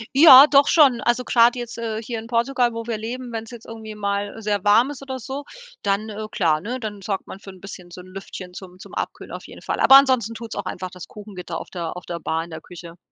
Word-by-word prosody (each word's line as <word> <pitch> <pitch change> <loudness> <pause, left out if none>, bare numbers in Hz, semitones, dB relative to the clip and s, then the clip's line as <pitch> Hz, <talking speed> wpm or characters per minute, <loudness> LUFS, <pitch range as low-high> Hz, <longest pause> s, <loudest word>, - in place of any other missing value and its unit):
Ja, 280 -2 +10
doch 280 0 +5
schon. 270 -8 +5
Also 240 +2 +1
grad 235 0 +4
jetzt, 240 -1 -6
äh, 225 -1 -4
hier 230 0 -5
in 225 - -10
Portugal, 240 0 +1
wo 230 0 -5
wir 230 -2 -3
leben, 240 +3 -6
wenn 225 -1 -3
es 225 - -14
jetzt 235 -2 -11
irgendwie 220 -1 -9
mal 200 +1 -3
sehr 205 -2 -1
warm 220 +6 +4
ist 280 -2 -8
oder 265 -1 -6
so, 270 +4 -6 0.4
dann, 200 +2 -1
äh, 215 +1 -6
klar, 155 -4 +1
ne, 245 +7 -4
dann 210 -3 -6
sorgt 195 0 -4
man 190 - -9
für 195 -1 -11
bisschen 185 -1 -11
so 180 - -10
'n 185 - -15
Lüftchen 185 -1 -9
zum 180 -1 -11
zum - - -13
Abkühlen - - -5
auf - - -8
jeden - - -13
Fall. - - -3
Aber 270 - +7
ansonsten 255 -5 +4
tut 230 -1 -8
es - - -7
auch 195 - -5
einfach 185 0 -5
das 180 -3 -10
Kuchengitter 190 -5 -8
auf - - -10
der 170 -1 -5
auf 180 - -10
der 170 -1 -5
Bar 160 0 -2
in 170 - -12
der 160 - -8
Küche. 170 -1 -12
220 Hz, 260 wpm, -22 LUFS, 190-240 Hz, 0.4 s, Ja